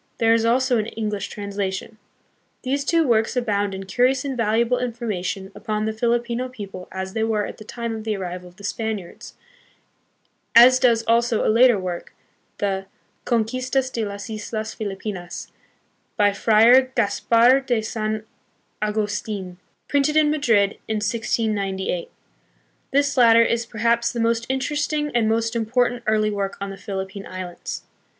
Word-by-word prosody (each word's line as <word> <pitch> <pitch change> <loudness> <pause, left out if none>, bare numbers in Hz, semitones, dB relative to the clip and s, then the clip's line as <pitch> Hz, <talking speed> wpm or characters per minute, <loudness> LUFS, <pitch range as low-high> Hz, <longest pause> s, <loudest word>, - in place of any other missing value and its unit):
There 225 0 +4
is 230 0 +2
also 250 +1 +2
an 215 - -2
English 210 -3 -3
translation. 200 +1 -4 0.6
These 275 +2 -1
two 330 -1 +2
works 225 -1 +2
abound 205 -5 0
hi 190 - -6
curious 250 +8 +1
and 270 -2 -2
valuable 230 +2 +1
infor 240 -1 -4
mation 190 -1 -4
upon 215 +1 -2
the 220 - -1
Filipino 240 +2 -1
people 195 -6 -8
as 190 0 -5
they 220 - 0
were 215 -2 0
at - - -8
the - - -9
tune 235 +1 -5
of 220 - -7
the 215 -1 -1
arrival 180 -1 -6
of 175 - -22
the 200 - -15
Spaniards, 210 -3 -5 1.2
as 250 +2 +8
does 235 -3 +3
also 230 0 +2
a - - +3
later 240 -1 +6
work, 180 -2 -5 0.4
the 195 -1 -2 0.4
Oonquistas 255 +3 0
de 230 - -2
las 200 0 -5
Islas 220 0 -5
Filipinas, 195 -3 -6 0.7
by 205 -1 +4
Friar 235 +5 +5
Gaspar 235 +4 +4
de 245 -5 -1
San 215 -1 -3 0.6
Augustfn, 210 -3 -2 0.3
printed 285 +2 +2
in 300 -1 +4
Madrid 225 -10 +2
in 220 - -1
1698. 210 -4 -1 0.8
This 280 0 +1
latter 230 -2 +7
is 235 0 0
perhaps 235 +1 +1
the 240 - -4
most 230 0 +1
interesting 295 +2 -1
and 230 -2 +2
most 225 +1 0
important 240 +2 +1
early 215 0 +2
work 200 -1 -3
on 200 0 -4
the - - -7
Philippine 195 0 -6
Islands. 185 -1 -6
220 Hz, 150 wpm, -22 LUFS, 205-240 Hz, 1.2 s, as